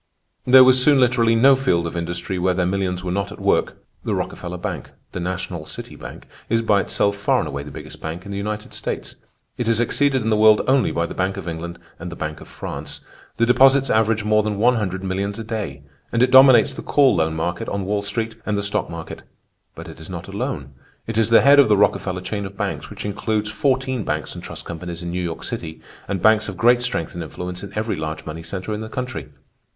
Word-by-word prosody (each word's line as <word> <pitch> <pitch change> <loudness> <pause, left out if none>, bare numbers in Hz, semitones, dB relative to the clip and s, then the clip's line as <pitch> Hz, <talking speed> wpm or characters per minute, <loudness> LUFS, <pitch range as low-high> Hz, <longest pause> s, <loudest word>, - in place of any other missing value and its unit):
There 130 +1 +9
was 130 0 +6
soon 145 -1 +5
literally 120 -2 +3
no 135 +4 +6
field 90 -11 +1
of 85 - -5
industry 85 +2 -3
where 90 0 +1
their 90 -1 +1
millions 90 -1 -1
were 90 - -3
not 100 0 -2
at - - -10
work.... - - +1 0.3
"The - - -1
Rockefeller 90 0 -4
bank—the 90 - -7
National 90 -2 -4
City - - -8
Bank—is 115 0 -5
by 105 -3 +3
itself 100 +1 0
far 100 0 +1
and - - -1
away 70 +1 -4
the 75 - -9
biggest - - -10
bank 85 +4 -6
in 100 - -7
the 100 - -4
United 105 +1 -5
States. - - -5 0.4
It 120 - -1
is 115 -1 +2
exceeded 135 +2 +2
in 110 - 0
the 110 - +3
world 110 0 +6
only 130 -1 +3
by 85 - -1
the - - -6
Bank 95 +1 -1
of 95 -3 -7
England 85 +1 -5 0.2
and 85 +1 -6
the - - -7
Bank 75 -1 -5
of - - -11
France. - - -7 0.4
The 115 - +3
deposits 135 +2 +5
average 110 0 +2
more 105 0 +3
than 105 -1 -2
one 120 +3 +3
hundred 95 -3 -3
millions 100 +2 -2
a 115 - -5
day; 105 - -5 0.3
and 115 +1 +2
it 125 - +2
dominates 130 +1 +7
the - - -7
call 140 -4 +4
loan 80 0 0
market 85 +2 -3
on 100 -1 -3
Wall 100 +1 0
Street 110 +3 -3
and 105 -1 -1
the 100 - -1
stock 100 - -1
market. 85 -1 -7 0.5
But - - -9
it - - -11
is - - -11
not - - -7
alone; 70 -1 -4 0.3
it 115 0 -2
is 115 - +2
the 115 - +7
head 140 +1 +7
of 140 - +6
the 105 - +5
Rockefeller 95 -2 +1
chain 100 +2 -4
of 100 0 -14
banks, 105 -2 -3
which - - -8
includes 105 +1 -2
fourteen 130 +1 0
banks - - -3
and - - -9
trust - - -8
companies 85 0 -6
in 85 - -4
New 90 +1 -2
York 85 -2 -5
City, 80 -1 -5 0.3
and 95 -3 -3
banks 110 0 +4
of 95 - -8
great 120 +1 +4
strength 125 -10 -2
and 85 - -5
influence 90 +2 -6
in 100 - -8
every 110 +1 -1
large 80 0 -5
money 80 +1 -6
center 95 +5 -5
in 105 - -4
the 110 - -6
country. 125 - -5
100 Hz, 230 wpm, -21 LUFS, 90-115 Hz, 0.5 s, There